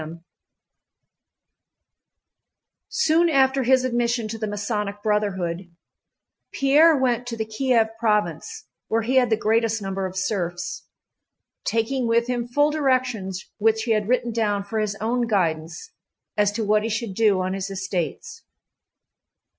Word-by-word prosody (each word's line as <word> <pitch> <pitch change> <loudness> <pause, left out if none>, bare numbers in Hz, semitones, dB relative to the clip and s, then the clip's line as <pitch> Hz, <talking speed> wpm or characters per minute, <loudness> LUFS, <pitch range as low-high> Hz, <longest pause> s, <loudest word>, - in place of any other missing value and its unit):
CHAPTER 155 +1 -7
X 170 - -18 2.7
Soon 340 -6 +3
after 270 -2 +3
his 260 +1 +3
admission 235 -2 0
to 225 +1 -5
the 215 - -2
Masonic 205 0 -3
Brotherhood, 190 -5 -1 0.8
Pierre 295 +3 +5
went 245 -2 0
to 230 -1 -4
the 220 - -2
Kiev 225 0 +1
province, 210 - -1 0.2
where 225 0 0
he 255 +4 +1
had 250 -2 +4
the 220 - +2
greatest 225 +1 +1
number 195 -1 -3
of 185 - -10
serfs, 180 -2 -3 0.8
taking 235 +3 0
with 230 +1 +2
him 245 -1 -2
full 290 +5 +2
directions 255 -10 -1
which 220 +1 +2
he 230 - -1
had 215 -1 +1
written 245 -1 +1
down 210 -3 0
for 220 +2 -3
his 210 -1 -1
own 235 +3 -1
guidance 170 - -1 0.4
as 205 -1 +2
to 220 - -2
what 210 +1 +3
he 225 - -2
should 225 -2 -3
do 210 -2 +3
on 185 0 -1
his 195 0 -4
estates. 190 - -4
220 Hz, 145 wpm, -23 LUFS, 200-245 Hz, 2.7 s, Pierre